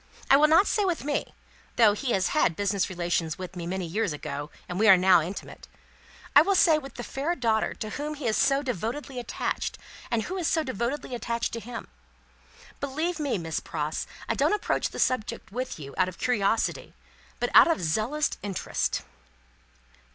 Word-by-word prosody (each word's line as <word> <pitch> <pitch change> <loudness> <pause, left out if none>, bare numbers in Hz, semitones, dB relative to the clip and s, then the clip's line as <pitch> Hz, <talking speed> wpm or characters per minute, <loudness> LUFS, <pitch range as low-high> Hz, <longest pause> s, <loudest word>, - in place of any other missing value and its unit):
I - - +10
will 300 +2 +6
not 330 +6 +6
say 415 - +1
with 360 -4 -1
me, 290 +1 -2 0.4
though 220 -3 +6
he 245 +4 -2
had 190 - +2
business 200 0 0
relations 170 -3 -1
with 185 0 -7
me 170 -1 -5
many 185 0 -2
years 175 0 -1
ago, 145 0 -5 0.2
and 175 +1 -4
we 220 - +4
are 195 -3 +9
now 180 -1 +5
intimate; 180 +5 -7 0.7
I 290 - +10
will 390 +5 +2
say 320 -4 +5
with 275 -2 -11
the 240 - -6
fair 290 +8 -2
daughter 225 -6 0
to 215 - -5
whom 300 +4 -4
he 285 -3 -7
is 220 -2 +2
so 275 +1 +3
devotedly 250 - -4
attached, 240 - -3 0.3
and 230 -2 0
who 375 - -4
is 345 -3 -1
so 320 -1 +2
devotedly 255 +2 -3
attached 235 -1 -2
to 230 - -3
him? 235 +1 -7 0.9
Believe 310 +5 -2
me, 285 -7 0
Miss 165 -2 -3
Pross, 155 0 -3 0.2
I - - +1
don't - - +2
approach 420 - -1
the - - -9
topic 255 -4 0
with 255 +4 -4
you, 140 -2 -8
out 185 0 +3
of 180 - -11
curiosity, 225 -3 0 0.4
but - - -1
out - - +8
of 330 - +2
zealous 220 - 0
interest." 200 -3 -2
230 Hz, 185 wpm, -27 LUFS, 185-290 Hz, 0.9 s, I